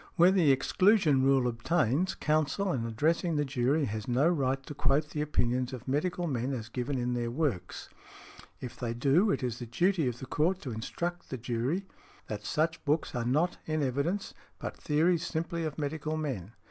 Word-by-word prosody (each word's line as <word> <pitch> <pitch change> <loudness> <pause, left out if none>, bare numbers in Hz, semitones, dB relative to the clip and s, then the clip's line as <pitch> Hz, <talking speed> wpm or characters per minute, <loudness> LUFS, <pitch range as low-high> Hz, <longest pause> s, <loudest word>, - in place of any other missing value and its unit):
Where 175 +1 +6
the 175 -7 +4
exclusion 155 +1 +4
rule 135 -1 +4
obtains, 150 - +1
counsel 155 +5 +1
in 115 -3 -2
addressing 160 - +1
the 145 0 +1
jury 135 +3 +1
has 110 -1 -4
no 130 +5 +3
right 135 -5 0
to 150 - -7
quote 145 +2 +1
the 150 - -2
opinions 125 -4 0
of 125 -1 -8
medical 175 +6 0
men 130 -3 -1
as 110 -3 -5
given 125 +3 -2
in 125 0 -1
their 120 -1 -1
works; 130 - -2 0.7
if 125 - -7
they 115 -1 -3
do, 145 - +3
it 170 - 0
is 120 -2 -2
the 120 - -6
duty 165 - +1
of 120 -1 -2
the 130 - -7
Court 170 +8 +1
to 130 - -5
instruct 170 +10 -4
the 130 - -4
jury 125 - -2 0.4
that 105 -1 -5
such 160 +8 0
books 150 +1 0
are 120 -1 -2
not 155 +9 +1
in 155 -1 0
evidence 140 +10 -1 0.2
but - - -5
theories 165 +3 +1
simply 170 0 -2
of 155 - -4
medical 155 +1 -2
men. 120 - -4
140 Hz, 185 wpm, -30 LUFS, 125-165 Hz, 0.7 s, Where